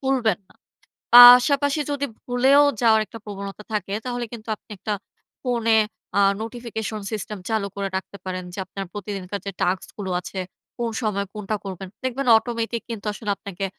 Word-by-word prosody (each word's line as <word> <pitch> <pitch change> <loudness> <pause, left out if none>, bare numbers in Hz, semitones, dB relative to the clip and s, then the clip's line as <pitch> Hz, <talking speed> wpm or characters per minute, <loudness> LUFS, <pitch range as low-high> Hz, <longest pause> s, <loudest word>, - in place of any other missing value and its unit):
ভুলবেন 255 -7 +1
না। - - -23 0.6
পাশাপাশি 270 +4 +9
যদি 285 0 -1 0.2
ভুলেও 265 +4 +5 0.2
যাওয়ার 220 -2 +5
একটা 225 - -10
প্রবণতা 200 0 -7
থাকে, 200 -1 -2
তাহলে 245 -1 -2
কিন্তু 225 -1 -9
আপনি - - -44
একটা 205 +3 -3 0.5
ফোনে 230 -3 +2 0.4
আ - - +5 0.2
নোটিফিকেশন 225 -2 -5
সিস্টেম 210 -1 -4
চালু 215 -3 0
করে 200 -1 -2
রাখতে 200 +1 -8
পারেন, 185 -1 -4
যে 195 - -6
আপনার 195 +1 -6
প্রতিদিনকার 200 -1 -5
যে 200 - -3
টাস্কগুলো 190 +2 -2
আছে, 190 +2 -6 0.4
কোন 235 -1 -1
সময় 205 -3 -1
কোনটা 210 0 -3
করবেন। 190 -1 -6 0.2
দেখবেন 260 +1 -2
অটোমেটিক 230 0 -3
কিন্তু 220 -2 -6
আসলে 210 0 -6
আপনাকে 195 -1 -5
220 Hz, 155 wpm, -23 LUFS, 200-245 Hz, 0.6 s, পাশাপাশি